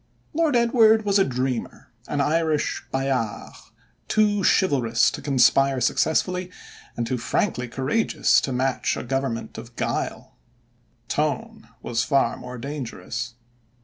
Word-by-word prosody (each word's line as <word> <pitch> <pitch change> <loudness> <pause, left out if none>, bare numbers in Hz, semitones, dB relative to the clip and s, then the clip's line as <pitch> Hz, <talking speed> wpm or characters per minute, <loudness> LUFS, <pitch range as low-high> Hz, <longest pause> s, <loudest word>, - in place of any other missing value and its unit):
Lord 315 -3 +1
Edward 225 -2 +4
was 200 0 +3
a - - +6
dreamer, 130 -4 -3 0.2
an 145 -1 -1
Irish 155 +1 0
Bayard, 135 -5 -2 0.5
too 205 -2 +2
chivalrous 125 -14 +3
to - - -7
conspire 135 0 +3
successfully 180 - +1 0.5
and 120 - -1
too 125 +1 -2
frankly 125 - -1
courageous 135 - +1
to 135 - -3
match 130 +1 0
a - - -4
government 120 -3 -3
of 120 +1 -12
guile. - - -3 0.7
Tone 215 - -2
was 115 -1 0
far 135 -4 +2
more 125 0 -8
dangerous. 125 -3 -5
135 Hz, 120 wpm, -24 LUFS, 125-185 Hz, 0.7 s, a